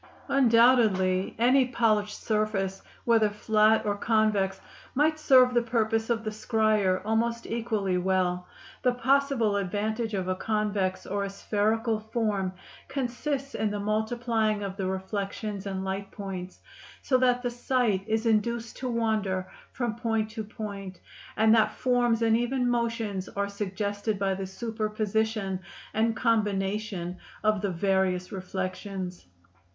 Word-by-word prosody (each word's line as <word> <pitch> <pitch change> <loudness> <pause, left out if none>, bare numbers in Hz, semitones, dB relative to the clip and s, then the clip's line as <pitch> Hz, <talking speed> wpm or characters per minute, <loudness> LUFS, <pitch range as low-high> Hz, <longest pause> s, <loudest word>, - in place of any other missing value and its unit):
Undoubtedly 230 -8 +4
any 255 +3 +4
polished 215 -4 +1
surface, 210 -3 -1 0.2
whether 225 -3 +4
flat 215 +1 +3
or 205 -1 +1
convex, 205 -3 +1 0.4
might 310 +3 +2
serve 255 -4 +6
the 240 - +4
purpose 225 -1 0
of 230 -1 0
the 215 - -3
scryer 215 -4 +1
almost 230 +2 0
equally 215 -5 -1
well; 180 -1 0 0.3
the 250 -1 +2
possible 260 -4 +2
advantage 215 +3 -2
of 185 -1 -2
a 185 - +1
convex 200 -2 -1
or 200 0 -2
a 200 - -3
spherical 215 +3 0
form 215 -4 -1 0.4
consists 275 +2 -3
in 220 - 0
the 205 0 -3
multiplying 220 0 0
of 195 -1 -4
the 195 -2 -2
reflections 195 +1 -4
and 190 -1 -3
light 195 +1 -3
points 190 -3 -7 0.4
so 255 -2 +3
that 250 -1 +2
the 245 - -1
sight 240 -5 0
is 220 +1 0
induced 230 +1 0
to 255 - -3
wander 215 -5 0 0.2
from 240 -3 -2
point 225 -2 -1
to 220 -1 -4
point, 200 -4 -7 0.4
and 220 0 +5
that 220 -2 +3
forms 240 -2 +2
and 225 -1 +4
even 245 +2 0
motions 230 -5 -1
are 200 0 -2
suggested 205 +1 -2
by 195 -1 0
the 190 0 -4
superposition 215 -1 -2 0.3
and 225 +1 +1
combination 205 -5 -1 0.2
of 215 -2 +2
the 200 - 0
various 185 0 0
reflections. 185 - -5
215 Hz, 135 wpm, -28 LUFS, 195-230 Hz, 0.4 s, serve